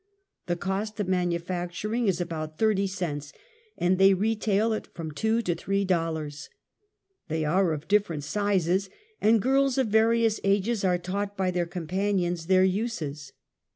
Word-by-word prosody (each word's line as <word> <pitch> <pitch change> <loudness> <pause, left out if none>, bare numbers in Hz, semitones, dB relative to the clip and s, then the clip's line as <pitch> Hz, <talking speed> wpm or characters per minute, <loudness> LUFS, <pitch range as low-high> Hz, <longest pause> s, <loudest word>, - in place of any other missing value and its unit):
The 175 - 0
cost 195 +4 -3
of 205 - -1
manu 180 -2 +1
facturing 180 +6 -3
is 190 - +1
about 155 -3 -4
thirty 210 -3 +2
cents, 155 -7 -4 0.4
and 180 +1 +1
they 195 0 +6
retail 215 +1 +1
at 215 - -4
from 160 -2 -5
two 220 +9 0
to 180 - 0
three 195 +4 -1
dollars. 160 -5 -2 0.8
They 160 -1 -1
are 180 +3 +2
of 155 +1 -4
difterent 195 -7 +1
sizes, 195 +1 0 0.3
and 225 +1 +5
girls 270 +1 +2
of 260 -4 +1
various 225 0 +3
ages 200 +2 +1
are 180 -2 +3
taught 200 +3 -4
by 185 -1 +1
their 175 -1 -1
companions 175 0 -1
their 185 0 +5
uses. 175 - -3
190 Hz, 155 wpm, -27 LUFS, 170-210 Hz, 0.8 s, they